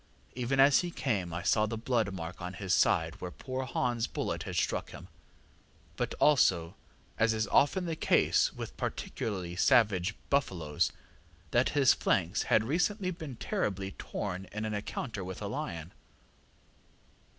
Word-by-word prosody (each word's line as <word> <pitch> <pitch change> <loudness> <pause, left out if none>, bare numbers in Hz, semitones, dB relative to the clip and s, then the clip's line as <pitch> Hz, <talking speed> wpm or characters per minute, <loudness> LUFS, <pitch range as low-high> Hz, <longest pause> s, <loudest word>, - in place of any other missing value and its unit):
Even 125 +2 -1
as 135 +1 +7
he 175 - -2
came 115 - -2
I 85 +2 -4
saw 105 +2 +3
the 115 +1 -3
blood 115 -2 0
mark 90 -1 -6
on 90 +1 -5
his 95 0 -2
side - - +2
where 90 - -4
poor 130 +6 -5
HansŌĆÖ 120 -2 -1
bullet - - -2
had - - -5
struck - - 0
him, - - -11 0.9
and - - -1
also, 90 - +3 0.4
as 110 0 +3
is 110 0 0
often 180 +6 +3
the 165 -2 -2
case - - +3
with - - -7
particularly 90 -5 -4
savage 105 -1 +3 0.2
buffaloes, 85 - +1 0.6
that - - +3
his 135 -2 +6
flanks 90 +1 +1
had 110 - +4
recently 185 - 0
been 160 -7 -7
terribly 100 -4 -2
torn 95 -1 -5
in 105 +1 -3
an 110 - -2
encounter 105 0 -4
with 95 0 -6
a 105 - -5
lion. 95 - -5
110 Hz, 150 wpm, -31 LUFS, 95-130 Hz, 0.9 s, as